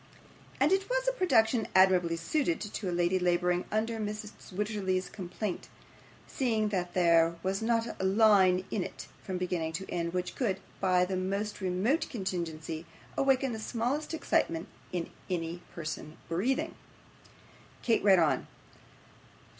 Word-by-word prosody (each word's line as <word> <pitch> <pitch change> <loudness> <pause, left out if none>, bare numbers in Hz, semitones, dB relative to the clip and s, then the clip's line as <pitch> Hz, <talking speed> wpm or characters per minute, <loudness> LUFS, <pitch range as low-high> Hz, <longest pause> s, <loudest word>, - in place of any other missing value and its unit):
And 280 +5 +4
it 390 +2 +2
was - - 0
a - - +5
production 245 - +3
admirably 185 -3 +5
suited 170 - 0
to 210 -2 -4
a - - -1
lady 175 +2 +2
labouring 180 0 +1
under 225 +1 0
Mrs. 210 0 -6
Wititterly's 190 -2 -1
complaint, 185 +1 -5 0.6
seeing 220 -5 0
that 180 -3 -2
there 170 -2 +4
was 190 +2 -1
not 230 -1 0
a - - -1
line 190 -2 +5
in 195 - 0
it, - - -7 0.2
from 185 -1 -4
beginning 175 -3 -2
to 190 +4 -4
end, 170 -1 -1
which 180 0 -2
could, 220 -8 0 0.2
by 180 -2 +3
the 190 +1 -2
most 200 +3 -2
remote 190 - +1
contingency, 170 - -4 0.3
awaken 270 -2 +2
the 220 - -4
smallest 255 +8 -2
excitement 165 - 0 0.2
in 175 -2 -3 0.2
any 170 -1 -2
person 155 -1 -6
breathing. 210 +11 0 1.1
Kate 230 -2 +2
read 195 -2 +7
on. 160 -3 +2
190 Hz, 140 wpm, -30 LUFS, 175-225 Hz, 1.1 s, read